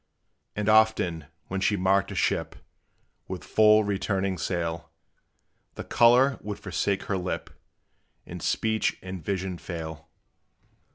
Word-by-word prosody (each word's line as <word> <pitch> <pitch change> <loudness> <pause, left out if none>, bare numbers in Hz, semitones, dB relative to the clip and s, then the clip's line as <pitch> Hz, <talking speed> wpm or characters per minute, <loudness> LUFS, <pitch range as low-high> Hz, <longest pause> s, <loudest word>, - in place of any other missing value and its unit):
And 105 0 -2
often, 110 -8 +3 0.2
when 95 0 -4
she 100 +1 +2
marked 95 +1 +2
a - - -6
ship - - 0 0.7
With 90 -4 -6
full, 110 0 +5
returning 95 -2 -1
sail, 85 0 -3 0.9
The - - -6
color 125 +2 +4
would 105 -1 -5
forsake 100 -1 -2
her 95 - -2
lip, 90 0 -4 0.7
And - - -8
speech 110 -1 0
and 95 -2 -7
vision 95 -1 -3
fail. 80 -2 -7
95 Hz, 120 wpm, -26 LUFS, 90-105 Hz, 0.9 s, full